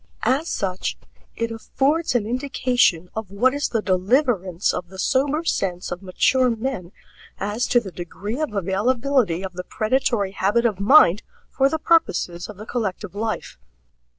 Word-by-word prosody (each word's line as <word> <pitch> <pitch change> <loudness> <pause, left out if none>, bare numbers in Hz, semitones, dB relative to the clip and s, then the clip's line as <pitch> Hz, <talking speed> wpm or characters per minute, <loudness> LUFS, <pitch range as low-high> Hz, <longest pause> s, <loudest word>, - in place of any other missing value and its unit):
As 265 +8 +1
such 190 -4 -2 0.4
it 230 0 -2
affords 275 +7 0
an 225 -4 +2
indication 245 - +1
of 220 -3 -5
what 245 +7 +2
is 285 0 -1
the 225 -3 -1
deliverance 190 - +1
of 180 - -4
the 190 - -12
sober 280 - +1
sense 180 - -2
of 180 - -4
mature 250 +7 +2
men 225 -6 -3 0.5
as 210 +4 -1
to 240 - +4
the 200 -5 -8
degree 190 - -6
of 310 - -1
availability 210 +1 +1
of 190 -1 -5
the 180 +1 -5
predatory 215 -1 0
habit 205 +5 +1
of 210 -5 +1
mind 205 - +6 0.3
for 270 0 +3
the 320 - -1
purposes 185 - +1
of 210 - -9
the 215 - -9
collective 210 -5 -3
life. 215 - -4
220 Hz, 155 wpm, -22 LUFS, 190-260 Hz, 0.5 s, mind